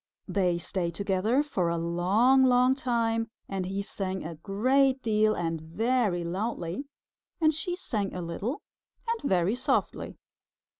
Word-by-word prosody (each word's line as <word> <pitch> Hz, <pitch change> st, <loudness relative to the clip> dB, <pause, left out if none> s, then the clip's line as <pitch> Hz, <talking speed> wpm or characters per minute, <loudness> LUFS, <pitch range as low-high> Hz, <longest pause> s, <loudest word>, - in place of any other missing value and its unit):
They 180 Hz, -3 st, +1 dB
stayed 170 Hz, -1 st, -3 dB
together 200 Hz, -, +1 dB
for 185 Hz, -, -1 dB
a 170 Hz, -, 0 dB
long, 190 Hz, +11 st, +3 dB
long 250 Hz, 0 st, +5 dB
time, 230 Hz, -4 st, 0 dB, 0.2 s
and 190 Hz, -2 st, -3 dB
he 195 Hz, +1 st, -2 dB
sang 190 Hz, -2 st, -4 dB
a 165 Hz, -, -5 dB
great 255 Hz, -, +2 dB
deal 215 Hz, -1 st, +3 dB
and 165 Hz, -2 st, -2 dB
very 205 Hz, +2 st, 0 dB
loudly, 185 Hz, -, -3 dB, 0.5 s
and 315 Hz, -1 st, +4 dB
she 335 Hz, +4 st, -3 dB
sang 210 Hz, -, -2 dB
a 180 Hz, -, -5 dB
little 195 Hz, -, -4 dB, 0.4 s
and 460 Hz, 0 st, -1 dB
very 180 Hz, +2 st, +2 dB
softly. 250 Hz, -, -1 dB
205 Hz, 140 wpm, -28 LUFS, 175-250 Hz, 0.5 s, long